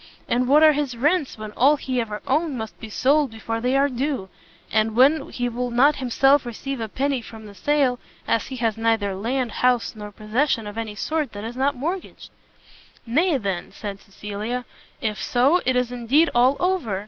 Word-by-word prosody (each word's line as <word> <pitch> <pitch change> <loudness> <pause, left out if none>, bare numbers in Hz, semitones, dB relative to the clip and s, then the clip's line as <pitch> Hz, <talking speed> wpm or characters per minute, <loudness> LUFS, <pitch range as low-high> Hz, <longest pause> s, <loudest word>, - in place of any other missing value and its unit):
and 250 +1 +1
what 295 +4 +6
are 310 - +8
his 280 -4 -2
rents, 295 +2 +1
when 215 -1 -7
all 275 +7 +4
he 260 -3 -2
ever 215 -2 -6
owned 290 +1 0
must 220 -1 -7
be 225 - -8
sold 280 +6 +2
before 225 0 -4
they 250 +3 +1
are 280 +1 +4
due, 260 -6 -3 0.4
and 220 0 +1
when 275 +4 +4
he 245 -1 -2
will 245 +1 -3
not 270 +5 +4
himself 270 +2 +3
receive 250 +3 -5
a 220 - -4
penny 270 +2 -1
from 220 -1 -11
the 205 - -11
sale, 260 +3 +1 0.3
as 225 - +1
he 265 - -6
has 230 -3 -1
neither 225 -3 +1
land, 235 +5 -2
house, 250 -1 +1
nor 210 -1 -8
possession 225 +3 -1
of 205 0 -7
any 225 -2 -4
sort 305 +4 -2
that 205 0 -7
is 230 +2 -6
not 275 +2 +1
mortgaged?" 340 +9 -5 0.7
"Nay, 300 +7 +2
then," 195 -7 -3
said 200 -2 -7
Cecilia, 210 +5 -5 0.4
"if 210 -4 -2
so, 270 +9 +3
it 260 - +3
is 250 -1 0
indeed 250 +7 +2
all, 255 +3 +4
over! 350 - 0
245 Hz, 195 wpm, -23 LUFS, 220-280 Hz, 0.7 s, are